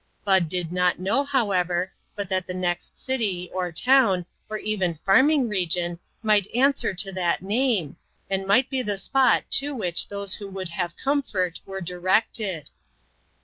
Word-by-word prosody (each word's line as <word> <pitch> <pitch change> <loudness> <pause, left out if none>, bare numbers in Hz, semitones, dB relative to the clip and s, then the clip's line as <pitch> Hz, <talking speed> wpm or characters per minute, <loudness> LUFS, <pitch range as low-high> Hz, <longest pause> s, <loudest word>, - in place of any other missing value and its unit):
Bud 190 -5 +3
did 175 -1 -2
not 180 0 +1
know, 200 +10 +1
however, 190 -10 0 0.2
but 205 -2 -4
that 185 0 -2
the 180 - -5
next 175 -1 -3
city, 210 -10 -2
or 180 -1 -2
town, 200 -2 +3 0.2
or 215 - -3
even 195 -6 -1
farming 260 - +3
region 175 -4 -1 0.2
might 210 -3 +3
answer 275 0 +3
to 195 +2 +2
that 180 -2 -1
name, 205 - 0 0.3
and 195 0 -2
might 250 +6 +4
be 265 -2 -1
the 205 -4 -2
spot 255 +3 +3
to 285 +1 +2
which 180 -7 -1
those 200 -1 +1
who 200 - -4
would 190 -2 -6
have 170 0 -4
comfort 210 - -1
were 195 0 -6
directed. 185 0 -1
195 Hz, 155 wpm, -24 LUFS, 180-225 Hz, 0.3 s, might